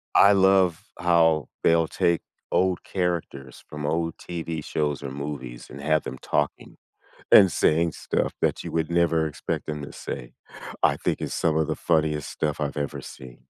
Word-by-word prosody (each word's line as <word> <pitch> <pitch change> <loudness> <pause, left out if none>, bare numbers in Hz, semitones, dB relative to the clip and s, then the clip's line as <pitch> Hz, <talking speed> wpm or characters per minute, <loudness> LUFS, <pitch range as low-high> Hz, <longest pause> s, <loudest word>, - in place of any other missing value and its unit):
I 100 - +8
love 95 -3 +3
how 80 -3 +3
they'll 80 -1 +3
take 85 -1 +1 0.3
old 95 -1 +1
characters 85 -8 -3
from 75 -1 -5
old 80 +2 -1
TV 85 -2 -5
shows 75 -2 -1
or 70 - -5
movies 70 -3 -6
and 70 - -9
have 75 +1 +2
them 65 - -6
talking - - -2 0.5
and 95 -3 +8
saying 80 +2 +2
stuff - - -2
that - - 0
you - - -6
would 80 0 -1
never 85 -2 +2
expect 75 - -4
them 75 -1 -4
to 70 - -8
say; - - -7 0.5
I - - +4
think - - -2
it's - - -3
some 80 -2 +1
of 80 -1 +2
the - - -1
funniest 75 -3 0
stuff 75 -1 -2
I've 75 -1 -2
ever 70 -1 -3
seen. 65 -2 -11
80 Hz, 175 wpm, -25 LUFS, 75-85 Hz, 0.5 s, I